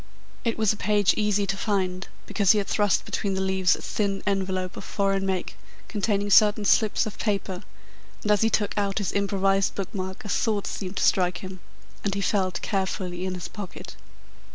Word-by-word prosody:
It 230 -2 0
was 220 -2 +3
a - - -9
page 205 -2 +3
easy 210 -1 +1
to 195 - -1
find, 190 -3 -1 0.2
because 200 -2 +3
he - - 0
had 205 - +1
thrust 205 -3 +1
between 195 -2 -2
the - - -1
leaves 190 -1 +2
a - - -10
thin 200 -2 -1
envelope 190 -2 -1
of - - -7
foreign 195 -1 0
make 185 -2 -2 0.3
containing 205 -1 0
certain 210 0 +5
slips 215 +1 +3
of 215 - -7
paper, 195 -3 -1 0.6
and 210 - +1
as 210 - +4
he 225 - +4
took 205 -2 0
out 200 -1 -1
his 205 -3 0
improvised 195 -1 +1
book 195 +2 -4
mark 190 0 -5
a - - -5
thought 210 -1 0
seemed 190 0 -5
to - - +1
strike 180 -2 +3
him, 185 0 -7 0.4
and 200 -1 -1
he 200 - -1
felt 190 -2 0
carefully 185 -2 -2
in 185 - -3
his 180 - -5
pocket. 205 -4 -8
195 Hz, 195 wpm, -26 LUFS, 190-205 Hz, 0.6 s, certain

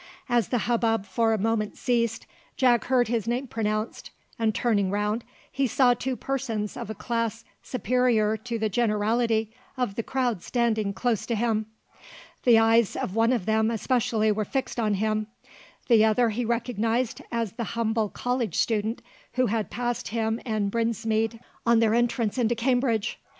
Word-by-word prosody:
As 240 -4 +2
the 250 - 0
hubbub 225 -3 +1
for 225 +4 +1
a 220 - +2
moment 215 0 -1
ceased, 235 -3 0 0.3
Jack 245 -3 +3
heard 250 -1 +3
his 230 -2 -1
name 245 +3 -1
pronounced; 215 -2 -3 0.3
and 220 -2 +1
turning 205 -5 +1
round, 210 +3 -1 0.3
he 275 -1 +1
saw 250 0 +4
two 255 +2 -3
persons 240 -6 -3
of - - -6
a 220 - -4
class 230 0 -2 0.2
superior 240 -3 +1
to 230 +2 -4
the 220 -1 0
generality 220 +1 +1 0.2
of 250 -6 -1
the 230 - -2
crowd 245 -5 -1
standing 220 -3 0
close 220 +1 -1
to 235 - 0
him. 220 -1 0 0.8
The 240 -2 +7
eyes 225 -1 +4
of 185 - -3
one 225 +2 +3
of 235 -8 0
them 220 0 +2
especially 225 -1 +1
were 215 +1 0
fixed 265 +3 -3
on 215 -3 +1
him. 215 +1 0 0.6
The 230 -3 +6
other 225 +1 +3
he 235 +3 -2
recognised 235 0 -1
as 230 -4 -1
the 235 - -4
humble 220 -2 +1
college 245 -6 -2
student 225 +2 0 0.3
who 255 +1 +2
had 220 -1 -1
passed 240 -1 -2
him 225 0 -1
and 215 -4 -1
Brinsmead 225 0 0 0.2
on 235 0 +4
their 225 -1 +3
entrance 235 -1 +1
into 240 0 +2
Cambridge. 240 -2 0
230 Hz, 165 wpm, -26 LUFS, 215-240 Hz, 0.8 s, The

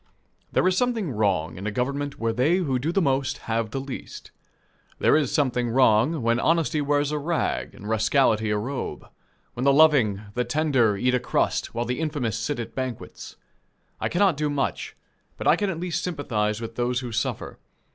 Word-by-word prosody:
There - - +2
is 185 - +2
something 230 - 0
wrong 95 -8 0
in 95 +3 -5
a - - -1
government 140 +5 -2
where 115 0 0
they 130 +9 +2
who 140 -9 0
do 150 +6 -1
the 195 +1 +1
most 135 -1 0
have 115 -1 -1
the 135 - -3
least. 135 0 -8 0.7
There - - +4
is 150 -5 +1
something 125 -4 +1
wrong, 125 +4 +3
when 115 +1 +2
honesty 160 0 +1
wears 145 0 +1
a 150 - -1
rag, 165 +3 -2
and 105 - -10
rascality 110 0 +2
a 105 - +1
robe; 130 +6 -4 0.5
when 125 - -4
the 140 - +5
loving, 135 -9 +4
the 125 - 0
tender, 125 -5 +2
eat 125 +5 +1
a 125 - +3
crust, - - -1
while 120 +1 -1
the 125 +3 -2
infamous 140 -9 -2
sit 140 +4 -2
at 115 - -6
banquets. 130 -3 -6 0.6
I - - -1
cannot 180 -3 +2
do 150 0 0
much, 145 -1 -2 0.4
but - - -6
I - - +6
can 205 -1 -1
at 165 -4 -4
least 175 -1 -2
sympathize 115 -10 -1
with 115 0 -7
those 125 +1 0
who 125 -2 -6
suffer. 115 +1 -3
130 Hz, 190 wpm, -25 LUFS, 115-150 Hz, 0.7 s, I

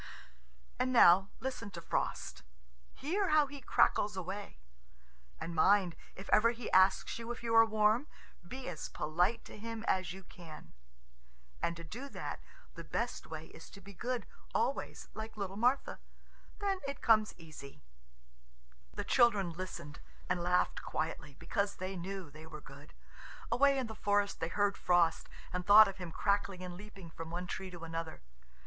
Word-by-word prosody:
And 255 - +1
now, 195 -5 +7
listen 250 -4 -4
to 180 -3 -8
Frost. 65 - -2 0.5
Hear 375 +7 0
how 305 -1 +5
he 280 0 -9
crackles 210 -4 +2
away! 185 - -5 0.8
And 170 - -5
mind, 185 +1 +4 0.2
if 195 - -9
ever 225 +2 +6
he 235 -1 -5
asks 190 +4 +4
you 230 +1 -5
if 240 - -7
you 230 -1 -1
are 225 0 +8
warm, 220 +5 +3 0.3
be 255 +9 -8
as 175 -4 -5
polite 180 +9 0
to - - -11
him 225 +1 -5
as 185 -3 +1
you 190 +1 -9
can. 170 -4 -12 0.9
And 170 0 -1
to 170 - -8
do 245 - -7
that, - - -5 0.3
the - - -8
best - - -3
way - - -7
is - - -12
to 200 - -12
be 200 0 -12
good 245 +6 -3 0.3
always, - - -1
like 220 0 -7
little 195 -2 -4
Martha. 245 +6 +1 0.6
Then 395 -2 -1
it 280 - -6
comes 215 -2 +4
easy. 150 - -12 1.1
The - - -2
children 210 -8 +4
listened, 170 -4 -7 0.3
and 180 -1 0
laughed 180 +1 +1
quietly, 145 -3 -4
because 200 +5 -1
they 185 +1 -4
knew 185 -2 -6
they 155 +2 -11
were 155 -1 -8
good. 145 +1 -14 0.6
Away 275 +1 +4
in 260 - 0
the 220 - -6
forest 205 -1 +1
they 165 - -1
heard 200 +3 +1
Frost, 175 -2 +3 0.2
and 180 0 -2
thought 210 +3 +9
of 195 - -5
him 180 -3 -6
crackling 200 0 0
and 180 -1 -6
leaping 195 -3 -11
from 165 0 -7
one 175 +2 -4
tree 190 +1 -5
to 175 -2 -10
another. 165 - -5
195 Hz, 165 wpm, -34 LUFS, 170-225 Hz, 1.1 s, thought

